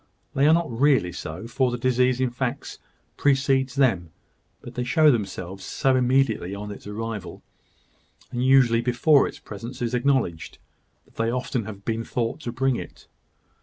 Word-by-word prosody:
They 140 Hz, +2 st, +3 dB
are 155 Hz, -, +6 dB
not 170 Hz, -5 st, -1 dB
really 125 Hz, -6 st, +2 dB
so, 80 Hz, +3 st, -7 dB
for 125 Hz, +2 st, 0 dB
the 120 Hz, -, -3 dB
disease 125 Hz, 0 st, +2 dB
in 130 Hz, -2 st, +1 dB
fact 125 Hz, 0 st, -4 dB, 0.4 s
precedes 135 Hz, -2 st, +2 dB
them; 110 Hz, -12 st, +2 dB, 0.5 s
but -, -, -11 dB
they 125 Hz, -, -2 dB
show 150 Hz, +4 st, +4 dB
themselves 95 Hz, -4 st, -4 dB
so 135 Hz, -2 st, +1 dB
immediately 125 Hz, -7 st, +1 dB
on 105 Hz, +1 st, -6 dB
its 100 Hz, -, -10 dB
arrival, 110 Hz, -1 st, -6 dB, 0.9 s
and 120 Hz, 0 st, -2 dB
usually 130 Hz, -3 st, +5 dB
before 130 Hz, +4 st, +3 dB
its -, -, -8 dB
presence 115 Hz, +5 st, -9 dB
is 120 Hz, 0 st, -2 dB
acknowledged, 125 Hz, -, 0 dB, 0.5 s
that -, -, -28 dB
they 115 Hz, -, +1 dB
have 120 Hz, -, 0 dB
often 125 Hz, -3 st, -3 dB
been 115 Hz, 0 st, -1 dB
thought 115 Hz, +2 st, -2 dB
to 125 Hz, -6 st, -5 dB
bring 130 Hz, +1 st, 0 dB
it. -, -, -10 dB
125 Hz, 165 wpm, -24 LUFS, 115-135 Hz, 0.9 s, are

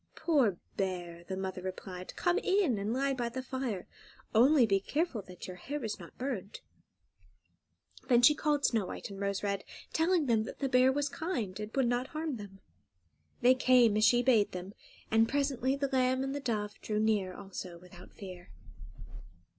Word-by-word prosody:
"Poor 265 Hz, -, +2 dB, 0.2 s
bear!" 175 Hz, -3 st, -3 dB
the 190 Hz, +1 st, -4 dB
mother 190 Hz, -1 st, -4 dB
replied; 185 Hz, 0 st, -6 dB
"come 350 Hz, 0 st, +2 dB
in 375 Hz, -, +2 dB
and 205 Hz, +2 st, -2 dB
lie 275 Hz, +3 st, +1 dB
by 240 Hz, -2 st, -2 dB
the 260 Hz, +2 st, -5 dB
fire; 255 Hz, -8 st, -3 dB, 0.5 s
only 255 Hz, +3 st, +6 dB
be 195 Hz, -3 st, +2 dB
careful 285 Hz, -, -1 dB
that 180 Hz, -2 st, -10 dB
your 180 Hz, -1 st, -8 dB
hair 285 Hz, +9 st, -5 dB
is 215 Hz, -, -4 dB
not -, -, -12 dB
burnt." 235 Hz, -7 st, -4 dB, 1.5 s
Then 245 Hz, -2 st, +4 dB
she 300 Hz, -, +8 dB
called 295 Hz, -1 st, 0 dB
Snow 220 Hz, -6 st, +1 dB
White -, -, -6 dB
and 195 Hz, -, -8 dB
Rose 200 Hz, 0 st, -1 dB
Red, 200 Hz, -1 st, -1 dB, 0.3 s
telling 330 Hz, 0 st, +2 dB
them 230 Hz, -4 st, +3 dB
that -, -, -8 dB
the 275 Hz, -, -1 dB
bear 255 Hz, +1 st, +5 dB
was 285 Hz, +1 st, 0 dB
kind, 260 Hz, -, -3 dB
and 210 Hz, 0 st, -5 dB
would 265 Hz, -3 st, +3 dB
not 245 Hz, +2 st, 0 dB
harm 310 Hz, -3 st, -3 dB
them. 195 Hz, -2 st, -11 dB, 0.8 s
They 250 Hz, +1 st, +7 dB
came, 250 Hz, -4 st, +4 dB
as 215 Hz, -, +2 dB
she 245 Hz, +2 st, +5 dB
bade 230 Hz, -6 st, +3 dB
them, 185 Hz, +2 st, -6 dB, 0.4 s
and 225 Hz, +1 st, +4 dB
presently 275 Hz, -2 st, +1 dB
the 280 Hz, 0 st, -1 dB
lamb 260 Hz, 0 st, +2 dB
and 270 Hz, 0 st, -2 dB
the 285 Hz, -, -3 dB
dove 215 Hz, -6 st, -3 dB
drew 210 Hz, -1 st, -1 dB
near 210 Hz, -4 st, +1 dB
also 190 Hz, -3 st, -7 dB
without 180 Hz, 0 st, -14 dB
fear. 180 Hz, -3 st, -10 dB
230 Hz, 180 wpm, -31 LUFS, 195-270 Hz, 1.5 s, she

